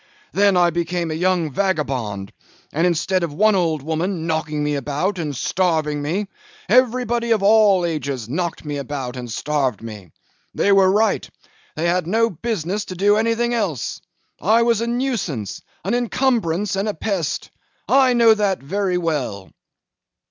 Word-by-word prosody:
Then 200 Hz, -1 st, +4 dB
I 175 Hz, -1 st, +4 dB
became 170 Hz, 0 st, -2 dB
a -, -, -1 dB
young 175 Hz, -1 st, 0 dB
vagabond; 130 Hz, -, -2 dB, 0.4 s
and 165 Hz, +4 st, +2 dB
instead 180 Hz, +2 st, +1 dB
of 165 Hz, -4 st, -3 dB
one 215 Hz, +4 st, +4 dB
old 165 Hz, -6 st, 0 dB
woman 165 Hz, +2 st, -2 dB
knocking 155 Hz, -2 st, -1 dB
me 150 Hz, 0 st, 0 dB
about 145 Hz, +8 st, -2 dB
and 150 Hz, -4 st, -3 dB
starving 155 Hz, -1 st, 0 dB
me, 175 Hz, +8 st, -1 dB, 0.4 s
everybody 240 Hz, -1 st, +2 dB
of 220 Hz, -3 st, +2 dB
all 205 Hz, -3 st, +5 dB
ages 140 Hz, -8 st, -3 dB
knocked 170 Hz, +5 st, -3 dB
me 145 Hz, -1 st, -3 dB
about 135 Hz, -2 st, -5 dB
and 120 Hz, -2 st, -6 dB
starved 135 Hz, -3 st, -1 dB
me. 105 Hz, -6 st, -9 dB, 0.5 s
They 200 Hz, -, +2 dB
were 195 Hz, -1 st, +5 dB
right; 215 Hz, +3 st, +1 dB, 0.5 s
they 160 Hz, -, -2 dB
had 175 Hz, -1 st, 0 dB
no 230 Hz, +4 st, +2 dB
business 200 Hz, +1 st, -3 dB
to 185 Hz, -, -7 dB
do 205 Hz, +3 st, +3 dB
anything 230 Hz, +2 st, +1 dB
else. 195 Hz, -, -2 dB, 0.4 s
I 220 Hz, +7 st, +4 dB
was 230 Hz, -2 st, +2 dB
a 230 Hz, -, -1 dB
nuisance, 235 Hz, -, -2 dB, 0.2 s
an -, -, 0 dB
incumbrance, 225 Hz, -7 st, 0 dB
and 195 Hz, +2 st, -1 dB
a 210 Hz, -, -3 dB
pest. 175 Hz, -3 st, -2 dB, 0.4 s
I 265 Hz, -2 st, +4 dB
know 230 Hz, -2 st, +6 dB
that 205 Hz, -3 st, +1 dB
very 185 Hz, +5 st, -1 dB
well. 145 Hz, -, -3 dB
180 Hz, 155 wpm, -21 LUFS, 150-210 Hz, 0.5 s, know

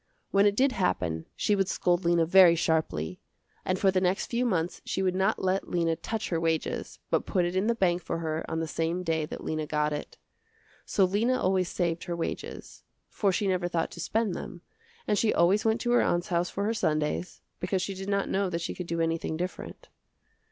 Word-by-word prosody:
When 200 Hz, +1 st, +5 dB
it 205 Hz, -, +2 dB
did 270 Hz, +4 st, +3 dB
happen 90 Hz, -, -1 dB
she 210 Hz, -, +1 dB
would 195 Hz, -2 st, +1 dB
scold 175 Hz, 0 st, +1 dB
Lena 170 Hz, -1 st, +3 dB
very 175 Hz, 0 st, +7 dB
sharply, 155 Hz, -, -1 dB, 0.4 s
and 185 Hz, -, 0 dB
for 195 Hz, 0 st, +3 dB
the 185 Hz, 0 st, +1 dB
next 185 Hz, +2 st, +1 dB
few 245 Hz, +1 st, +1 dB
months 175 Hz, -5 st, -1 dB
she 190 Hz, -, -2 dB
would 185 Hz, -1 st, +2 dB
not 190 Hz, +3 st, +1 dB
let 190 Hz, +1 st, 0 dB
Lena 170 Hz, -2 st, +1 dB
touch 220 Hz, +6 st, -4 dB
her 165 Hz, -, 0 dB
wages, 165 Hz, -1 st, -2 dB
but -, -, +1 dB
put 180 Hz, -3 st, +1 dB
it 175 Hz, +1 st, -2 dB
in 190 Hz, +3 st, +1 dB
the 235 Hz, -, +2 dB
bank 180 Hz, -4 st, +1 dB
for 165 Hz, -, -3 dB
her 160 Hz, -1 st, -2 dB
on 160 Hz, -, -2 dB
the 165 Hz, -, -2 dB
same 165 Hz, +3 st, -1 dB
day 160 Hz, -3 st, 0 dB
that -, -, -7 dB
Lena 155 Hz, -1 st, -2 dB
got 150 Hz, 0 st, 0 dB
it. 145 Hz, -, -6 dB, 0.7 s
So 195 Hz, -, +3 dB
Lena 225 Hz, +7 st, +1 dB
always 185 Hz, -1 st, +1 dB
saved 170 Hz, -2 st, -1 dB
her 175 Hz, -, -3 dB
wages, 170 Hz, -, -5 dB, 0.3 s
for 200 Hz, -2 st, +1 dB
she 200 Hz, -, 0 dB
never 185 Hz, -2 st, +1 dB
thought 170 Hz, -2 st, -1 dB
to -, -, -10 dB
spend 215 Hz, +3 st, 0 dB
them, 180 Hz, -2 st, -7 dB, 0.5 s
and 210 Hz, -, +2 dB
she 225 Hz, -, +3 dB
always 190 Hz, +6 st, +3 dB
went 220 Hz, +1 st, +2 dB
to 240 Hz, -, 0 dB
her 245 Hz, -, +5 dB
aunt's 175 Hz, 0 st, 0 dB
house 175 Hz, 0 st, +1 dB
for 200 Hz, -, -3 dB
her 220 Hz, +2 st, +1 dB
Sundays 155 Hz, -3 st, -1 dB, 0.2 s
because 185 Hz, 0 st, -1 dB
she 195 Hz, -, -3 dB
did 190 Hz, +1 st, -6 dB
not 200 Hz, -1 st, +1 dB
know 195 Hz, 0 st, 0 dB
that 170 Hz, -1 st, -3 dB
she -, -, -3 dB
could 180 Hz, -, -6 dB
do 170 Hz, 0 st, -1 dB
anything 165 Hz, -1 st, -1 dB
different. 185 Hz, -, -6 dB
180 Hz, 220 wpm, -28 LUFS, 165-195 Hz, 0.7 s, very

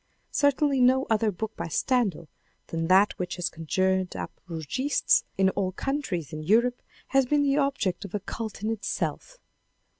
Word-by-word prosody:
Certainly 285 Hz, -1 st, +2 dB
no 260 Hz, +2 st, +4 dB
other 220 Hz, 0 st, +3 dB
book 220 Hz, +4 st, -5 dB
by -, -, -4 dB
Stendal 195 Hz, -, 0 dB, 0.4 s
than 165 Hz, 0 st, -2 dB
that 190 Hz, +3 st, +5 dB
which 180 Hz, -1 st, -3 dB
has 180 Hz, -1 st, -2 dB
conjured 185 Hz, +3 st, 0 dB
up -, -, -5 dB, 0.2 s
Rougistes 170 Hz, -, +1 dB
in 190 Hz, 0 st, +4 dB
all 185 Hz, -1 st, -2 dB
countries 205 Hz, -, -3 dB
in 155 Hz, -, -4 dB
Europe 235 Hz, +9 st, +2 dB, 0.3 s
has 270 Hz, -1 st, +3 dB
been 290 Hz, +2 st, +3 dB
the 280 Hz, 0 st, +2 dB
object 275 Hz, -10 st, 0 dB
of 200 Hz, 0 st, -6 dB
a -, -, 0 dB
cult 215 Hz, +1 st, -6 dB
in 220 Hz, -, 0 dB
itself. 225 Hz, -, -3 dB
210 Hz, 160 wpm, -27 LUFS, 180-260 Hz, 0.4 s, that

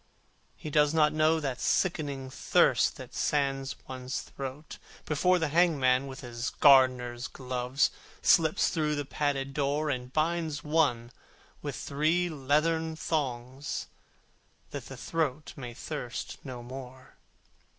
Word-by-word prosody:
He 155 Hz, -, -7 dB
does 150 Hz, +1 st, +3 dB
not 150 Hz, -1 st, +5 dB
feel 155 Hz, +1 st, +3 dB
that 135 Hz, -4 st, -3 dB
sickening 140 Hz, -7 st, 0 dB
thirst -, -, +3 dB
That -, -, -10 dB
sands 135 Hz, -2 st, 0 dB
one's 130 Hz, 0 st, -4 dB
throat, 135 Hz, +3 st, -8 dB, 0.3 s
before 180 Hz, +5 st, +3 dB
The 160 Hz, -3 st, 0 dB
hangman 140 Hz, -6 st, +3 dB
with 130 Hz, 0 st, -8 dB
his 120 Hz, -1 st, -4 dB
gardener's 130 Hz, -3 st, +4 dB
gloves 125 Hz, +1 st, -1 dB, 0.3 s
Comes 160 Hz, -2 st, +4 dB
through 150 Hz, -2 st, 0 dB
the 145 Hz, -1 st, -3 dB
padded 140 Hz, -1 st, -1 dB
door, 145 Hz, +1 st, 0 dB
And 125 Hz, -1 st, -4 dB
binds 155 Hz, 0 st, 0 dB
one 145 Hz, -7 st, +1 dB, 0.5 s
with -, -, -4 dB
three 160 Hz, +5 st, +1 dB
leathern 160 Hz, +3 st, +1 dB
thongs, 135 Hz, -4 st, -3 dB, 0.8 s
That -, -, -6 dB
the -, -, -9 dB
throat 155 Hz, -3 st, -2 dB
may 120 Hz, -4 st, -7 dB
thirst 125 Hz, -5 st, -5 dB
no 125 Hz, -3 st, -7 dB
more. 130 Hz, +1 st, -10 dB
140 Hz, 125 wpm, -29 LUFS, 130-155 Hz, 0.8 s, not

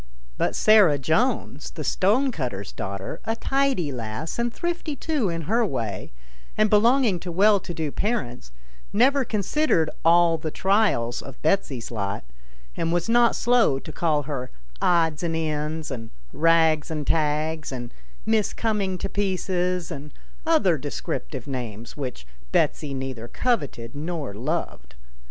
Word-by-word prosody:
But -, -, 0 dB
Sarah 210 Hz, -9 st, +6 dB
Jones, 155 Hz, -, 0 dB
the 155 Hz, -, -7 dB
stonecutter's 185 Hz, -, 0 dB
daughter, 95 Hz, 0 st, -5 dB
a 225 Hz, -, -1 dB
tidy 270 Hz, -, 0 dB
lass 120 Hz, -, -5 dB
and 235 Hz, 0 st, 0 dB
thrifty 345 Hz, 0 st, -3 dB
too 285 Hz, -, -1 dB
in 165 Hz, -1 st, -3 dB
her 230 Hz, +9 st, +2 dB
way, 115 Hz, -, -3 dB, 0.5 s
and 215 Hz, -1 st, +3 dB
belonging 225 Hz, -2 st, +4 dB
to 175 Hz, +1 st, -6 dB
well 200 Hz, +4 st, +5 dB
to 180 Hz, -, -8 dB
do 160 Hz, -3 st, -3 dB
parents, 130 Hz, -, -2 dB, 0.4 s
never 265 Hz, +6 st, +4 dB
considered 210 Hz, -, +1 dB
all 170 Hz, 0 st, +5 dB
the 155 Hz, -, -3 dB
trials 190 Hz, -, +1 dB
of 135 Hz, -2 st, -11 dB
Betsy's 145 Hz, -9 st, 0 dB
lot, 100 Hz, -, -3 dB, 0.5 s
and 165 Hz, 0 st, -1 dB
was 175 Hz, +3 st, 0 dB
not 235 Hz, 0 st, +5 dB
slow 240 Hz, -, +3 dB
to -, -, -8 dB
call 155 Hz, -4 st, +1 dB
her 135 Hz, -3 st, -4 dB, 0.2 s
" -, -, -23 dB
Odds 165 Hz, -3 st, +2 dB
and 165 Hz, -2 st, -1 dB
Ends," 155 Hz, -1 st, -2 dB
and 115 Hz, -4 st, -6 dB, 0.2 s
" -, -, -27 dB
Eags 160 Hz, -2 st, +3 dB
and 155 Hz, -2 st, -3 dB
Tags," 155 Hz, 0 st, 0 dB
and 120 Hz, -2 st, -6 dB, 0.2 s
" -, -, -26 dB
Miss 215 Hz, -2 st, +1 dB
Coming 205 Hz, -5 st, -1 dB
to 195 Hz, -, -3 dB
Pieces," 185 Hz, -3 st, -1 dB
and 145 Hz, -1 st, -7 dB, 0.4 s
other -, -, +3 dB
descriptive -, -, -4 dB
names, 120 Hz, -5 st, -6 dB
which 125 Hz, -, -5 dB, 0.3 s
Betsy 145 Hz, -3 st, +1 dB
neither 130 Hz, -3 st, -5 dB
coveted 140 Hz, -, -1 dB
nor 150 Hz, -4 st, -4 dB
loved. 100 Hz, -, -4 dB
160 Hz, 145 wpm, -25 LUFS, 135-210 Hz, 0.5 s, Sarah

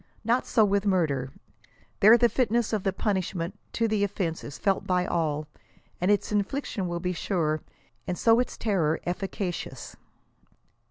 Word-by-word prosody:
Not 235 Hz, +3 st, +1 dB
so 220 Hz, -3 st, +4 dB
with 200 Hz, -1 st, +1 dB
murder. 145 Hz, -9 st, +1 dB, 0.7 s
There 220 Hz, +4 st, +8 dB
the 240 Hz, -, +5 dB
fitness 235 Hz, -2 st, +1 dB
of 215 Hz, -, +1 dB
the 195 Hz, -, 0 dB
punishment 190 Hz, -1 st, -2 dB
to 230 Hz, -, +1 dB
the 215 Hz, -2 st, 0 dB
ofiense 185 Hz, -5 st, -2 dB
is 145 Hz, -, -8 dB
felt 195 Hz, -1 st, 0 dB
by 180 Hz, -1 st, +2 dB
all, 155 Hz, -3 st, -1 dB, 0.5 s
and 180 Hz, -, +2 dB
its 205 Hz, 0 st, +2 dB
infliction 205 Hz, -1 st, -1 dB
will 175 Hz, 0 st, -3 dB
be 180 Hz, +1 st, -2 dB
sure, 160 Hz, -4 st, -1 dB, 0.5 s
and 180 Hz, -1 st, -2 dB
so 230 Hz, 0 st, +4 dB
its 250 Hz, -, -2 dB
terror 170 Hz, -8 st, +1 dB
efficacious. 180 Hz, 0 st, -4 dB
195 Hz, 155 wpm, -27 LUFS, 170-215 Hz, 0.7 s, There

